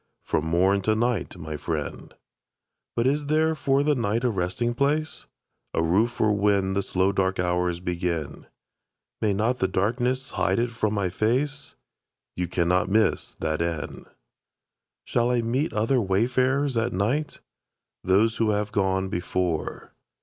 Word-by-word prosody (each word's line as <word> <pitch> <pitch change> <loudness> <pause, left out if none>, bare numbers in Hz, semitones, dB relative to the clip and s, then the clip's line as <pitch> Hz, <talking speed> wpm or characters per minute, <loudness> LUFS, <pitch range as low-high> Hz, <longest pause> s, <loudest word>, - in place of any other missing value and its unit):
From 80 - -1
morn 95 +4 +3
to 110 +3 +1
night, 115 -5 -1
my 80 -3 -6
friend. - - -4 0.8
But 115 - +1
is 145 +2 +1
there 160 +1 +2
for 140 -2 +1
the 150 0 +3
night 115 -2 0
a 125 - +2
resting 95 +5 -1
place? 150 +5 -1 0.5
A 80 - +2
roof 95 +8 +3
for 110 -3 +1
when 100 -2 +2
the 100 - +1
slow 95 0 +1
dark 95 -1 0
hours 90 -1 0
begin. 85 -3 -3 0.7
May 110 - +2
not 110 +6 0
the 95 - +2
darkness 120 +7 -1
hide 95 0 +1
it 120 0 0
from 110 -2 -1
my 100 -3 0
face? 130 +10 -1 0.6
You 90 0 -2
cannot 90 +2 +1
miss 110 +2 +1
that 80 0 -2
inn. 80 -4 -4 1.0
Shall 120 0 +1
I 125 -1 +2
meet 130 +7 0
other 115 +4 +1
wayfarers 130 +7 +1
at 115 +1 0
night? 120 +11 -1 0.6
Those 105 +5 +3
who 110 -1 +2
have 105 0 0
gone 95 -1 +1
before. 90 -2 -3
105 Hz, 150 wpm, -25 LUFS, 95-120 Hz, 1.0 s, morn